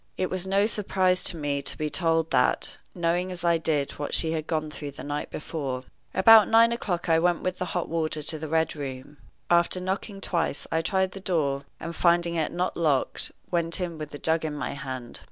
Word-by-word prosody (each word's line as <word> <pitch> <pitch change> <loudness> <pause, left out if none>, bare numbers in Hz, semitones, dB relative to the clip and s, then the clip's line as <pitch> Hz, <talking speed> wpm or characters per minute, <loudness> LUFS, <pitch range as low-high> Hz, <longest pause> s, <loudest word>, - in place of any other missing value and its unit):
It 185 - -1
was 185 0 -3
no 195 +2 +3
surprise 190 -4 +1
to 170 - +2
me 145 -2 -1
to - - -1
be 155 - -1
told 165 -2 +1
that, 125 - +2 0.2
knowing 175 +1 0
as 180 -1 -4
I 170 -1 +3
did 150 -4 0
what 145 - -1
she 160 - +1
had 155 -1 -3
gone 155 -2 -1
through 150 -1 -6
the - - -9
night 145 +1 -3
before. 135 -5 -4 0.3
About 215 +2 +8
nine 230 +1 +6
o'clock 185 -8 -2
I 165 -1 +4
went 175 0 +2
with 185 0 -2
the 180 - -1
hot 175 - -1
water 155 -2 -1
to 155 +1 -1
the 155 - -5
Red 160 +1 +1
Room. 135 0 -7 0.3
After 170 +1 +3
knocking 195 +2 -3
twice 170 -6 -1
I 160 - +2
tried 190 +2 +1
the 195 - -8
door, 145 -7 0
and, 170 0 -6
finding 170 0 +3
it 160 -3 0
not 180 +1 -1
locked, 150 -6 0 0.2
went 170 0 0
in 170 -3 -4
with 155 -1 -5
the 145 - -8
jug 160 +2 0
in 155 -2 -3
my 145 -3 -3
hand. 130 -3 -6
165 Hz, 215 wpm, -26 LUFS, 150-180 Hz, 0.3 s, About